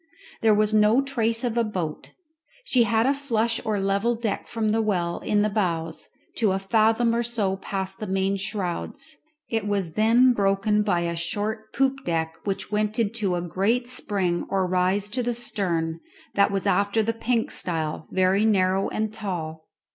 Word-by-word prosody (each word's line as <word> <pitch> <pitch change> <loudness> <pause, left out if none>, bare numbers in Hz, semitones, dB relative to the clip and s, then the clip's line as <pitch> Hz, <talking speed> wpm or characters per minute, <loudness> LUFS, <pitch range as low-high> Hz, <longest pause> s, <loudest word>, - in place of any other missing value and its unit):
There 220 -2 +5
was 215 0 +2
no 215 +3 +5
trace 230 -4 0
of 240 -1 0
a - - +3
boat. 180 -8 -4 0.5
She 250 - +3
had 225 0 +2
a 275 - +3
flush 235 -5 0
or 215 -2 -1
level 200 +5 +1
deck 225 -3 -3
from 225 -2 -1
the 225 +1 +2
well 180 -5 -1
in 205 -1 +1
the - - +3
bows 170 -6 -2 0.3
to 215 -5 +2
a - - +1
fathom 225 +4 +2
or 235 - +1
so 220 -5 -1
past 190 -1 -4
the 215 - -4
main 190 +1 0
shrouds; 195 +7 -4 0.3
it 225 -3 -2
was 195 -5 -1
then 235 +4 +5
broken 200 0 +2
by 180 -5 +1
a 170 0 -2
short 215 +5 -3
poop 270 0 0
deck, 160 -1 -1
which 195 +1 -3
went 210 0 0
in 225 -3 +1 0.2
a 175 -1 0
great 200 +8 0
spring 190 -8 -1
or 190 -1 +1
rise 185 +2 +1
to 250 +4 -1
the 240 0 -1
stern, 170 -8 -2 0.3
that 200 0 +4
was 195 -2 -2
after 200 +4 +2
the 230 +2 0
pink 230 0 -1
style, 160 -3 -2
very 190 +2 +2
narrow 195 -3 +2
and 215 0 -2
tall. 160 -7 -5
205 Hz, 175 wpm, -25 LUFS, 185-225 Hz, 0.5 s, There